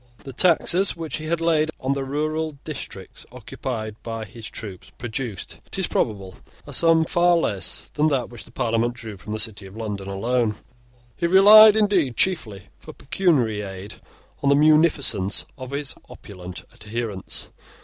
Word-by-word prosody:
The 135 - -9
taxes 180 +4 +3
which 165 -2 -5
he 155 0 -6
laid 165 -2 +1
on 130 +1 0
the 140 -1 -3
rural 155 +2 -2
districts 115 - -8
occupied 110 -5 -6
by 115 -1 -5
his 110 +2 -10
troops 100 -5 -8
produced, 120 -3 -5
it - - -5
is - - +2
probable, 100 -1 -2 0.3
a 145 - -9
sum 165 +2 +4
far 175 0 +3
less 100 - -2
than 150 +1 +2
that 130 -6 -1
which 120 - -9
the - - -17
Parliament 115 +1 0
drew 115 -4 -8
from 100 +3 -10
the 110 - -2
city 105 -3 +1
of 95 +3 -13
London 105 -3 -5
alone. 110 +3 0 0.6
He 170 - 0
relied, 210 +4 +9
indeed, 195 - +2
chiefly, 110 - 0
for - - -11
pecuniary 135 - +1
aid, 95 0 -8 0.4
on 140 - +2
the 140 - +5
munificence 150 - +3
of 130 -2 -8
his 140 0 -4 0.2
opulent 90 -3 -10
adherents. 105 -2 -4
125 Hz, 160 wpm, -23 LUFS, 105-155 Hz, 0.6 s, relied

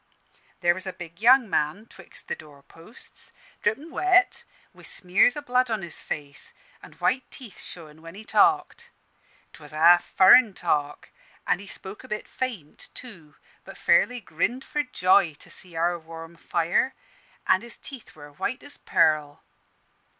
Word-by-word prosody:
"There 175 -1 +4
was 185 +2 -6
a 190 - -4
big 170 +1 -11
young 250 +1 +6
man 155 +4 -1
'twixt 190 -6 -12
the - - -2
doorposts, 155 - -13 0.3
drippin' 275 +11 -1
wet, 370 +2 +2 0.3
wi' - - -17
smears 200 +9 +2
o' - - -4
blood 255 -2 +1
on 220 -4 -2
his 170 - -5
face, 145 -2 -7 0.3
an' - - -14
white 255 +1 -1
teeth 230 -8 -12
showin' 160 -2 -10
when 165 +2 -11
he 215 +2 -11
talked. 380 - +2 0.6
'Twas 150 -1 -14
a - - -6
half 175 +2 +6
furrin 200 +2 +6
talk, 150 -4 -2 0.3
an' - - +1
he 200 - -11
spoke 195 +1 -7
a - - -12
bit 215 - -5
faint 220 - -6
too, 175 -12 -12 0.3
but - - -12
fairly 250 0 +3
grinned 225 +7 -2
for 295 - -1
joy 185 - +2
to - - -16
see 180 -3 -4
our 170 +1 0
warm 165 +1 -11
fire, 170 +10 0 0.5
an' 185 - +3
his 235 0 -8
teeth 265 -5 -11
were 145 -1 -13
white 250 - -4
as 285 - -8
pearl. 155 -3 +1
185 Hz, 160 wpm, -25 LUFS, 165-245 Hz, 0.6 s, young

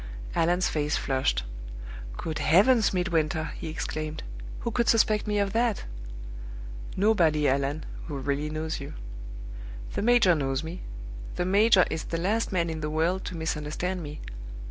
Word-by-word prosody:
Allan's 175 +2 +3
face 150 -1 +1
flushed. 130 - +1 0.7
"Good 160 -2 -3
heavens, 210 +9 +5
Midwinter," 160 -4 +1
he - - -4
exclaimed, 155 0 -3 0.4
"who 235 - -1
could 235 +1 +2
suspect 215 -2 +4
me 210 0 +1
of 200 -1 +1
that?" 230 -2 +2 1.1
"Nobody, 170 -8 +4
Allan, 140 +3 +1 0.2
who 145 -3 -3
really 140 +2 -1
knows 155 +1 -2
you." 140 - -7 1.0
"The - - -1
major 230 -5 +6
knows 135 -2 0
me. 165 +3 -6 0.5
The 175 - 0
major 200 0 +6
is 160 0 -2
the 165 - -2
last 205 +7 +1
man 170 -3 +2
in 160 -1 -4
the 150 - -1
world 165 +5 +1
to 175 - -4
misunderstand 160 +3 -2
me. 150 -1 -6
165 Hz, 145 wpm, -28 LUFS, 150-195 Hz, 1.1 s, major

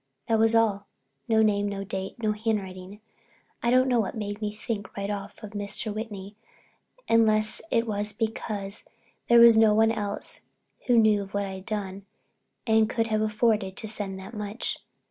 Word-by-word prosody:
That 225 -1 +2
was 225 +1 +4
all—no 200 - 0
name, 205 -1 +2
no 200 -1 -4
date, 190 -1 -5
no 215 - +2
handwriting. 205 -2 -3 0.6
I 235 - +1
don't 255 +1 +4
know 245 -2 +3
what 215 - -1
made 205 0 -4
me 210 -1 -1
think 210 -1 -6
right 200 +1 -2
off 205 +2 -7
of 210 - -7
Mr. 205 +1 -4
Whitney, 205 -2 -6 0.7
unless 215 -1 +3
it 230 0 +2
was 210 -1 -1
because 210 -2 -3 0.4
there 235 0 +7
was 235 -1 +9
no 220 -1 +5
one 225 +1 +4
else 205 -2 -4 0.5
who 245 -2 +4
knew 215 -2 +5
of 195 0 -8
what 200 0 0
I'd 190 -1 -8
done 200 -2 -4 0.6
and 220 -2 +3
could 225 -1 0
have 215 -1 +1
afforded 215 -3 +1
to 220 - -5
send 205 -3 -3
that 190 +4 -10
much. 210 +1 -4
210 Hz, 170 wpm, -27 LUFS, 200-220 Hz, 0.7 s, was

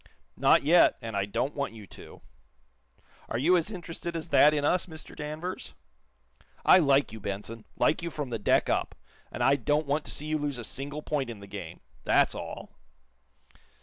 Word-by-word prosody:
"Not - - +4
yet, 170 +4 +5
and 115 -3 -6
I 100 -1 +1
don't 115 +7 -2
want 140 -4 -3
you 105 -2 -10
to." - - -14 1.1
"Are - - -1
you 165 +9 +4
as 170 +2 +1
interested 170 -3 -6
as 165 0 -5
that 150 - +6
in 145 -1 0
us, 180 +5 +1
Mr. 160 -2 -10
Danvers?" 155 +5 -6 0.9
"I 185 - +8
like 140 -3 +3
you, 110 - -8
Benson 105 +3 -6
like 155 - +2
you 170 - -3
from 145 -5 -5
the 115 - -2
deck 105 - +2
up, - - -1 0.4
and 120 - -3
I 135 +3 +4
don't 145 +4 0
want 145 +2 0
to - - -6
see 150 - -5
you 155 0 -1
lose 145 -3 -2
a 120 - -6
single 140 +9 -5
point 140 -5 -2
in 115 -3 -7
the 100 - -10
game. 95 -5 -8 0.2
That's - - +3
all." - - -7
145 Hz, 190 wpm, -28 LUFS, 115-155 Hz, 1.1 s, I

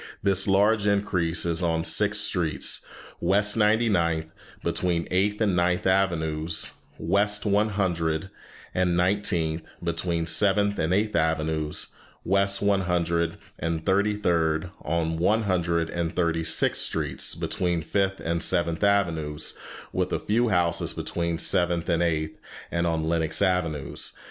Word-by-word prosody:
This 95 -1 +1
large 105 +2 +3
increase 90 -5 +1
is 85 0 0
on 80 -2 0
six 105 +4 +3
streets, 90 -7 0 0.4
West 105 +2 +2
Ninety 110 +1 +3
ninth, 85 -5 0 0.3
between 85 -2 -1
Eighth 100 +3 +1
and 105 -5 +1
Ninth 90 +1 +1
Avenues, 85 -4 0 0.3
West 105 +4 +1
One 105 +1 +2
Hundred 85 -3 -1 0.4
and 90 -1 +1
Nineteenth, 90 -4 0 0.2
between 85 0 -1
Seventh 100 +5 +2
and 80 - 0
Eighth 105 +3 +1
Avenues, 80 -1 -1 0.4
and - - -6
West 100 0 +2
One 100 -1 +3
Hundred 85 -2 0 0.2
and 80 -1 -3
Thirty 100 +2 +2
third 85 -3 0
to - - -5 0.3
One 105 +6 +2
Hundred 85 -4 0
and 85 -1 -3
Thirty 85 -2 0
sixth - - +2
Streets, 70 -3 0
between 85 -2 -1
Fifth 95 +2 0
and 85 0 -1
Seventh 85 0 +1
Avenues, 85 -7 0 0.4
with - - -1
a - - +1
few 115 +3 +1
houses 85 -3 +1
between 85 -1 -2
Seventh 85 -1 +1
and 85 -1 +2
Eighth, 80 -2 -1 0.3
and 85 0 0
on 80 -1 -1
Lenox 80 -1 +1
Avenues. 85 -7 -1
85 Hz, 140 wpm, -25 LUFS, 80-100 Hz, 0.4 s, large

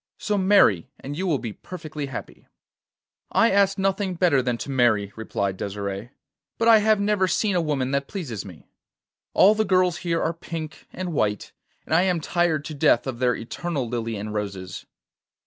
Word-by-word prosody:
So 210 - -1
marry, 190 - +4
and 140 +2 -6
you 190 +4 -2
will 155 -5 +2
be 115 -5 -6
perfectly 155 - -7
happy.' 135 - -8 0.9
'I 230 - +4
ask 195 0 +3
nothing 195 -1 0
better 170 -6 +3
than 125 -1 -1
to 140 - -5
marry,' 110 -6 +2
replied 100 -3 -3
Desire, 100 +2 -4 0.5
'but 230 - +1
I 225 -1 +8
have 215 0 +3
never 200 -2 +2
seen 200 +3 +1
a 175 - +3
woman 140 -5 -1
that 140 0 -1
pleases 130 - -5
me. 90 -5 -12 0.7
All 200 +3 +7
the 220 0 +1
girls 185 -3 +2
here 170 -2 -1
are 165 - 0
pink 165 -2 -7
and 180 -2 -5
white, 105 -7 -1 0.3
and - - -3
I 165 - +5
am 180 -2 +1
tired 160 -2 0
to 155 - -5
death 140 -4 +3
of 130 -3 -4
their 125 -1 +2
eternal 140 +2 -4
lilie 115 -1 -3
and 105 +1 -5
roses. 100 -4 -5
155 Hz, 180 wpm, -24 LUFS, 115-185 Hz, 0.9 s, I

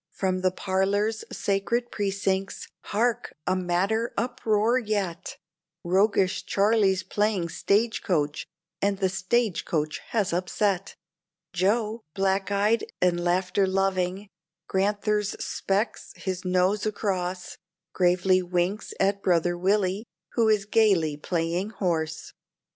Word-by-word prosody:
From 185 0 -1
from - - -5
the 185 - +3
parlor's 200 +4 0
sacred 220 +5 -1
precincts, 195 -1 -2 0.2
hark! 235 +3 0
a - - +1
madder 190 +6 0
uproar 235 -1 +1
yet; 200 -7 -3 0.5
Roguish 190 +1 +2
Charlie's 200 -2 +2
playing 200 -2 0
stage 220 +7 +1
coach, 150 -5 -1 0.3
and 200 0 +1
the 190 -1 +1
stage 190 +2 0
coach 155 -1 -2
has 210 -6 0
upset! 185 +2 -1 0.6
Joe, 215 +5 +1
black 195 0 +1
eyed 205 +3 +2 0.2
and 175 -1 +2
laughter 180 +2 +1
loving, 190 0 0 0.4
Grand'ther's 205 +1 0
specs 200 +4 -2
his 185 -1 -4
nose 185 +3 +1
across, 185 -4 -3 0.3
Gravely 185 +1 +3
winks 180 +3 -2
at 200 +1 +1
brother 175 -1 +2
Willie, 195 +3 0 0.2
who 230 -2 +2
is 210 -2 +2
gayly 195 -8 +3
playing 170 +5 -2
horse. 165 -6 -2
195 Hz, 115 wpm, -26 LUFS, 180-210 Hz, 0.6 s, the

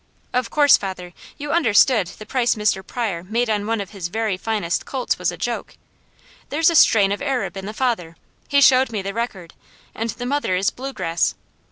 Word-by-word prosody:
Of 250 -2 0
course, 290 -2 +5
father, 185 -3 -6 0.2
you 290 0 -5
understood 235 - +4
the 215 - -10
price 245 -1 +1
Mr. 210 -3 0
Pryor 195 -6 -3
made 225 +4 -1
on 205 -1 -1
one 225 0 0
of 200 -2 -6
his 195 -5 -5
very 215 +1 -1
finest 190 -4 -2
colts 260 -2 -2
was - - 0
a - - -9
joke. - - -4 0.7
There's 325 +3 +3
a - - -1
strain 205 -9 +5
of 205 - -2
Arab 270 -6 -2
in 195 0 -6
the - - -4
father 215 -9 -2 0.3
he 280 0 +3
showed 260 -2 +5
me 210 -3 -3
the 195 +1 -4
record 195 -7 -5 0.4
and 225 +1 -3
the 245 - -5
mother 280 -7 0
is 190 +2 +1
bluegrass. 245 -11 -2
220 Hz, 195 wpm, -21 LUFS, 195-255 Hz, 0.7 s, course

